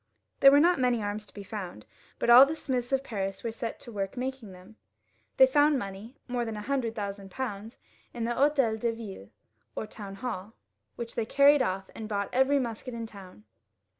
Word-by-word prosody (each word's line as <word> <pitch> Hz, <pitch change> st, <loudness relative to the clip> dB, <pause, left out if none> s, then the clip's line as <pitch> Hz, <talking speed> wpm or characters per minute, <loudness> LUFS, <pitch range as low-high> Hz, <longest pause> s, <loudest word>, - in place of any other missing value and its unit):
There 275 Hz, -, +9 dB
were 285 Hz, +1 st, +6 dB
not 345 Hz, 0 st, +4 dB
many 245 Hz, -3 st, +1 dB
arms 205 Hz, +1 st, -4 dB
to -, -, -21 dB
be 205 Hz, -, -7 dB
found, 185 Hz, -, -7 dB, 0.3 s
but 235 Hz, -, +2 dB
all 245 Hz, +2 st, +11 dB
the 300 Hz, +3 st, +1 dB
smiths 255 Hz, -5 st, -3 dB
of 270 Hz, 0 st, +1 dB
Paris 195 Hz, -5 st, -4 dB
were 230 Hz, -, -2 dB
set 225 Hz, 0 st, -5 dB
to 235 Hz, -, -10 dB
work 195 Hz, +1 st, -4 dB
making 255 Hz, -4 st, -4 dB
them. 185 Hz, +4 st, -15 dB, 0.6 s
They -, -, +9 dB
found 295 Hz, -, +4 dB
money, 200 Hz, +2 st, -7 dB
more 245 Hz, -1 st, -1 dB
than 225 Hz, -2 st, -4 dB
a -, -, -5 dB
hundred 245 Hz, -3 st, -1 dB
thousand 200 Hz, -2 st, -5 dB
pounds, 220 Hz, -1 st, -5 dB, 0.3 s
in 235 Hz, -, -5 dB
the 235 Hz, -, -1 dB
H6tel 265 Hz, -4 st, +2 dB
de 235 Hz, +1 st, 0 dB
ViUe, 200 Hz, -, -9 dB, 0.5 s
or -, -, -3 dB
Town 205 Hz, -2 st, -9 dB
HaU, 220 Hz, -3 st, -5 dB, 0.4 s
which 235 Hz, -1 st, -6 dB
they 225 Hz, -2 st, -2 dB
carried 285 Hz, +2 st, +5 dB
off, 190 Hz, -5 st, -2 dB
and 220 Hz, -1 st, -7 dB
bought 200 Hz, -1 st, -2 dB
every 265 Hz, +2 st, +3 dB
musket 240 Hz, -1 st, -4 dB
in 230 Hz, -1 st, -4 dB
the 225 Hz, -, -13 dB
town. 185 Hz, -, -13 dB
230 Hz, 205 wpm, -28 LUFS, 200-260 Hz, 0.6 s, all